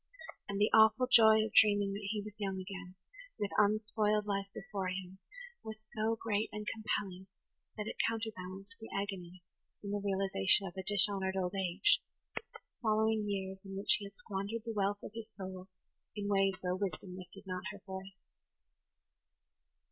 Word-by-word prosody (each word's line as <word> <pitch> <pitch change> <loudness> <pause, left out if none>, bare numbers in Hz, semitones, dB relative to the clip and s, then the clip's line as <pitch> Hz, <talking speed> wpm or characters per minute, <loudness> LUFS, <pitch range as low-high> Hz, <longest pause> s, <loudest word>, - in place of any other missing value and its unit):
And 200 0 -2
the 210 - +4
awful 220 +3 +7
joy 220 -3 +7
of 220 - -6
dreaming 205 -2 +5
that 200 0 -5
he 210 -1 -2
was 210 -1 -8
young 195 -2 -2
again, 190 -1 -7 0.4
with 205 -1 -2
unspoiled 210 0 +2
life 200 -1 -1
before 195 -1 -4
him, 185 0 -5 0.4
was 215 0 -8
so 220 +1 +1
great 215 -1 -1
and 210 0 -5
compelling 195 -4 -3 0.5
that 210 - -3
it - - -5
counterbalanced 200 -2 -5
the 225 - -9
agony 185 -3 -5 0.4
in 200 - -4
the 205 0 -1
realization 195 - +3
of 175 - -6
a 190 - -3
dishonoured 195 0 +3
old 180 0 -1
age, 190 0 +3 0.8
following 220 -1 +2
years 190 -1 -3
in 195 -1 -7
which 195 - +4
he 205 - -6
had 200 0 -11
squandered 205 +3 -4
the 230 - -3
wealth 205 0 0
of - - -7
his 225 -1 -7
soul 185 -1 -7 0.5
in 205 -1 -3
ways 195 -1 +3
where 180 0 0
Wisdom 190 -1 -3
lifted 185 +2 -10
not 185 -1 -4
her 200 -2 -12
voice. 190 0 -7
200 Hz, 165 wpm, -34 LUFS, 190-215 Hz, 0.8 s, awful